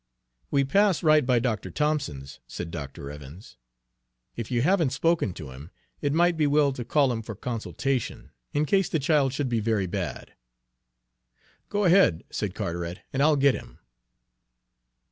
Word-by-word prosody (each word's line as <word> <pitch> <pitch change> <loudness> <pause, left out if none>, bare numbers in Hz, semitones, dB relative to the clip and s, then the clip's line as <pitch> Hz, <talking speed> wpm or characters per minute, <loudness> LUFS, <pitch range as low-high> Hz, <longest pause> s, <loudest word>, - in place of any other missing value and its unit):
"We 140 -1 +2
pass 195 +6 +2
right 155 -1 +5
by 125 -1 +2
Dr. 120 -2 -1
Thompson's," 145 - -2
said 85 -1 -6
Dr. 70 -3 -7
Evans. 75 +7 -11 0.8
"If 115 -2 -5
you 120 -1 +1
haven't 170 -3 +3
spoken 165 - +1
to 75 -6 -8
him, 70 +6 -11 0.3
it 145 - 0
might 170 +3 +3
be 155 -2 +3
well 145 -1 +3
to 125 - -5
call 140 +1 +2
him 115 -2 -2
for 110 -1 -7
consultation, 125 +3 -3 0.2
in 150 +1 +1
case 195 +3 +2
the - - +1
child 145 -2 +2
should 140 0 -2
be 120 -2 0
very 110 -3 0
bad." 90 - -5 1.4
"Go 205 0 0
on 190 - +4
ahead," 180 - +4
said - - -3
Carteret, 85 +1 -4
"and 135 - 0
I'll 150 +1 +5
get 140 -1 +4
him." - - -9
135 Hz, 165 wpm, -26 LUFS, 100-150 Hz, 1.4 s, right